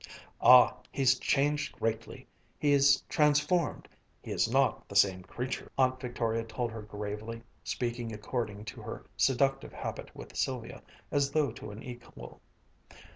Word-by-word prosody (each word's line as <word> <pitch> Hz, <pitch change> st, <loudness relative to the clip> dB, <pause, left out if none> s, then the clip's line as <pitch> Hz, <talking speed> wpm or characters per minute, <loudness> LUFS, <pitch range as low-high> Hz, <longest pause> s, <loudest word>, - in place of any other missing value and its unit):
"Ah, 125 Hz, -1 st, +8 dB
he's 130 Hz, -1 st, +3 dB
changed 145 Hz, +1 st, +1 dB
greatly 115 Hz, 0 st, -3 dB, 0.3 s
he's 140 Hz, -1 st, +4 dB
transformed 150 Hz, +3 st, +1 dB, 0.3 s
he -, -, -9 dB
is -, -, +1 dB
not 135 Hz, -2 st, +2 dB
the 100 Hz, -, -9 dB
same 95 Hz, -2 st, +4 dB
creature," 125 Hz, +7 st, -5 dB
Aunt 130 Hz, -1 st, +2 dB
Victoria 115 Hz, -3 st, -1 dB
told 115 Hz, +1 st, -3 dB
her 110 Hz, -1 st, -6 dB
gravely, 105 Hz, +2 st, -6 dB, 0.2 s
speaking 120 Hz, -1 st, -3 dB
according 105 Hz, -1 st, -4 dB
to -, -, -8 dB
her -, -, -7 dB
seductive 135 Hz, +1 st, +1 dB
habit -, -, -6 dB
with -, -, -10 dB
Sylvia, 125 Hz, 0 st, -3 dB, 0.3 s
as 140 Hz, -1 st, +2 dB
though 145 Hz, -1 st, +1 dB
to -, -, -9 dB
an 105 Hz, +2 st, -9 dB
equal. 120 Hz, -, -10 dB
125 Hz, 135 wpm, -30 LUFS, 110-135 Hz, 0.3 s, Ah